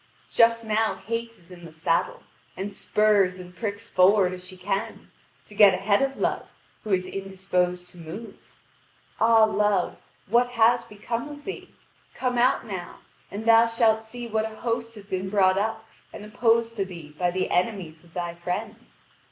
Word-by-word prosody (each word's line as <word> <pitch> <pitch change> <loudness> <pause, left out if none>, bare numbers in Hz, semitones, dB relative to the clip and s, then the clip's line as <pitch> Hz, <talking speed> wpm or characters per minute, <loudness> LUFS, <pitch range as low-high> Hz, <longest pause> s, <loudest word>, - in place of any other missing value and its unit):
Just 230 -1 +4
now 220 0 +1
Hate 230 +1 -2
is 185 -6 -18
in 175 -1 -12
the 165 - -10
saddle, 160 +1 -1 0.3
and 200 +2 -4
spurs 200 -3 +2
and 180 -1 -11
pricks 205 -2 -4
forward 185 0 +4
as 180 0 -8
she 185 0 -10
can, 195 +2 -4 0.3
to - - -14
get 200 -2 +7
ahead 200 +3 +2
of 270 0 -1
Love - - -1 0.4
who 215 - -7
is 185 -2 +1
indisposed 185 -2 -2
to 180 - -16
move. 170 +8 -8 0.8
Ah! 225 0 +5
Love, 210 -3 +1 0.2
what 240 +5 +3
has 235 +1 +4
become 230 +6 -5
of 290 0 -10
thee? 390 - -7 0.4
Come 250 -2 -1
out 250 +2 +3
now, 190 -5 -7 0.3
and 205 +3 -6
thou 230 0 +6
shalt 225 -1 +2
see 240 +2 -8
what 220 0 -1
a - - -12
host 230 0 -3
has 205 -2 -11
been 190 -1 -3
brought 190 -1 +3
up 220 +1 -2 0.3
and 210 - -9
opposed 230 +1 +1
to 195 - +1
thee 170 -5 -10
by 180 -1 +2
the 185 +1 -2
enemies 180 -4 -1
of 170 -1 -22
thy 175 -1 -3
friends. 205 +7 -6
205 Hz, 175 wpm, -25 LUFS, 185-230 Hz, 0.8 s, get